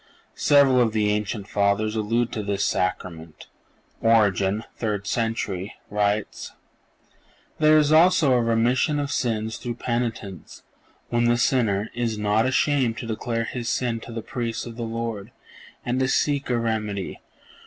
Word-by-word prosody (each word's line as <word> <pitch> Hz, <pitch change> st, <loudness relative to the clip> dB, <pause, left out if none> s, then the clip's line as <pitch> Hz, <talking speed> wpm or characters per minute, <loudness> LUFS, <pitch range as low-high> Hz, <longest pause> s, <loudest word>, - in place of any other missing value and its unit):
(483) -, -, -6 dB
Several 140 Hz, -3 st, +6 dB
of 115 Hz, -3 st, +1 dB
the 105 Hz, -1 st, +2 dB
ancient 105 Hz, -1 st, -2 dB
Fathers 105 Hz, +2 st, +1 dB
allude 115 Hz, +2 st, 0 dB
to 110 Hz, -, -3 dB
this 100 Hz, -1 st, -1 dB
Sacrament. 85 Hz, -4 st, -3 dB, 0.6 s
Origen 105 Hz, -2 st, +3 dB
(third 105 Hz, -3 st, -3 dB
century) 110 Hz, -4 st, -2 dB, 0.2 s
writes: 105 Hz, 0 st, -1 dB, 1.1 s
"There 155 Hz, 0 st, +6 dB
is 150 Hz, -1 st, +3 dB
also 160 Hz, -3 st, +5 dB
a 125 Hz, -, +3 dB
remission 120 Hz, +6 st, +2 dB
of 145 Hz, 0 st, -2 dB
sins 110 Hz, -4 st, -1 dB
through 120 Hz, -1 st, -5 dB
penitence, 115 Hz, -7 st, -4 dB, 0.5 s
when 120 Hz, 0 st, +1 dB
the 120 Hz, 0 st, +3 dB
sinner... 110 Hz, -5 st, +1 dB
is 115 Hz, -2 st, -2 dB
not 105 Hz, +3 st, +1 dB
ashamed 130 Hz, -3 st, +1 dB
to -, -, -5 dB
declare 115 Hz, +1 st, -2 dB
his 120 Hz, 0 st, -4 dB
sin 120 Hz, -2 st, -1 dB
to 115 Hz, -, -10 dB
the 115 Hz, -1 st, -5 dB
Priest 115 Hz, -3 st, -4 dB
of 120 Hz, -1 st, -8 dB
the 120 Hz, -, -7 dB
Lord, 115 Hz, -2 st, -4 dB, 0.6 s
and 125 Hz, +1 st, 0 dB
to 130 Hz, -, +2 dB
seek 140 Hz, 0 st, 0 dB
a 120 Hz, -, +1 dB
remedy 105 Hz, -4 st, -3 dB
115 Hz, 150 wpm, -24 LUFS, 105-120 Hz, 1.1 s, Several